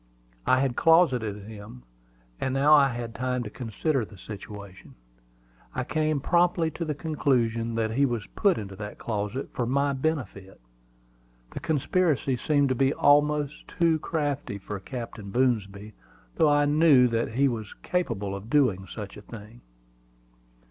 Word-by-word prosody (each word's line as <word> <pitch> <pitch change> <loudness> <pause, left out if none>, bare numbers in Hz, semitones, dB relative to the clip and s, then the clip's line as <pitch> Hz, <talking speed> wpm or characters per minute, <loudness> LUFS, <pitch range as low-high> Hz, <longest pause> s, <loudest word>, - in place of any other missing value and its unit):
I 130 0 +4
had 135 -3 0
closeted 125 - +3
him; 100 - -11 0.6
and 130 0 -1
now 145 +3 +5
I 145 -2 +7
had 120 -2 -5
time 125 0 -2
to 105 - -7
consider 125 +4 -1
the 105 -1 -11
situation. 100 0 -10 0.8
I 130 - -1
came 155 +2 0
promptly 170 +2 +2
to 170 - -5
the 150 -2 -2
conclusion 120 -7 0
that 110 -1 0
he 140 +5 +2
was 120 -4 -3
put 200 -3 +3
into 100 -2 -6
that 105 0 -7
closet 110 +3 -3
for 120 - -2
my 140 +2 +1
benefit. 130 -10 -3 0.9
The - - -6
conspiracy 160 -3 +1
seemed 145 +1 +1
to - - +2
be 135 +2 +1
almost 145 0 +2
too 165 -2 +1
crafty 145 -9 -2
for 100 +1 -6
Captain 115 -2 -7
Boomsby; 105 -3 -1 0.4
though 155 - +4
I 145 0 +4
knew 145 -4 +5
that 115 -1 -1
he 140 +4 +3
was 110 -5 -4
capable 105 - -2
of 100 +3 -9
doing 115 -10 +2
such 105 -3 -8
a - - -10
thing. 110 +2 -12
125 Hz, 150 wpm, -26 LUFS, 105-145 Hz, 0.9 s, I